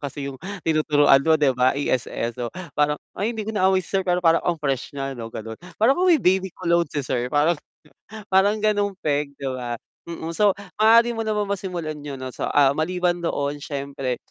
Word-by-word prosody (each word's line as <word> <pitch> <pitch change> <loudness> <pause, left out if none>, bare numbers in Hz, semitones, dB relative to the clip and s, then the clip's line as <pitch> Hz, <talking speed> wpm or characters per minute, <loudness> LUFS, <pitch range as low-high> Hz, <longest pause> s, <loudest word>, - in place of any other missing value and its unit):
kasi 140 -1 -5
yung 130 - -13 0.2
tinuturuan 150 -3 +4
mo 160 +3 +3
'di 145 -3 +3
ba 125 +1 +2
ESL 125 -4 -1
so 125 0 -5 0.3
parang, 150 +1 +1 0.2
"Ay 225 +3 -2
hindi 215 - -3
ko 220 - -4
na 190 -3 +3
aamoy 190 -1 +2
si - - -15
Sir, 195 - +2
pero 180 -1 0
parang 165 0 +5
ang 175 - 0
fresh 140 -2 -3
nya 135 0 -3
'no," 115 -3 -7
gano'n. 110 0 -8 0.2
"Parang 225 +5 +4
amoy 355 +2 +4
may 275 - -7 0.2
baby 190 - -5
cologne 170 -1 +1
si 145 -1 -3
Sir," 125 -1 -1
parang 150 +3 +2 0.7
parang 200 +3 +4
gano'ng 205 -2 0
peg 145 -4 -1
'di 140 - -7
ba, 120 -2 -4 0.3
mm. 165 0 -5
So, 205 +2 +3 0.2
maaari 230 +2 +6
mo 225 - -3
namang 215 -2 -1
masimulan 170 -6 -5
yon 145 -2 -6
'no. 130 -1 -7
So, - - -3
ah, 140 -1 +4
maliban 175 +3 0
doon 145 -3 -2
siyempre 140 -3 -4
155 Hz, 205 wpm, -23 LUFS, 140-190 Hz, 0.7 s, maaari